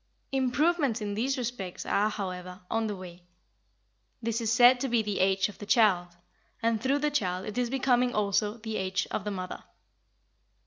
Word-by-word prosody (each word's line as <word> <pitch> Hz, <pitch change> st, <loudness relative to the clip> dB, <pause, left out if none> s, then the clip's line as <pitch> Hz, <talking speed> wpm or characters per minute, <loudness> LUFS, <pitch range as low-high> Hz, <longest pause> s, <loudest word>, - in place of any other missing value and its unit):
Improvements 270 Hz, 0 st, +1 dB
in 205 Hz, -2 st, -3 dB
these 260 Hz, +6 st, 0 dB
respects 230 Hz, -7 st, -4 dB
are, 210 Hz, +2 st, +2 dB
however, 185 Hz, -3 st, -6 dB
on 225 Hz, 0 st, +1 dB
the 205 Hz, -, -3 dB
way. 180 Hz, -2 st, -10 dB, 1.0 s
This 230 Hz, 0 st, -2 dB
is 225 Hz, -1 st, 0 dB
said 245 Hz, +2 st, +7 dB
to 270 Hz, +1 st, -1 dB
be 235 Hz, -2 st, +2 dB
the 210 Hz, -2 st, -2 dB
age 190 Hz, +1 st, +3 dB
of 205 Hz, -, -12 dB
the 205 Hz, -, -7 dB
child, 180 Hz, -7 st, +3 dB, 0.4 s
and 225 Hz, -2 st, 0 dB
through 265 Hz, +3 st, +2 dB
the 295 Hz, +1 st, 0 dB
child 185 Hz, -9 st, -1 dB
it 215 Hz, -, -6 dB
is 245 Hz, -1 st, 0 dB
becoming 250 Hz, -1 st, +2 dB
also 210 Hz, 0 st, 0 dB
the 220 Hz, -1 st, -4 dB
age 190 Hz, 0 st, -1 dB
of 200 Hz, -, -3 dB
the -, -, -1 dB
mother. 185 Hz, -2 st, -5 dB
215 Hz, 180 wpm, -28 LUFS, 195-245 Hz, 1.0 s, said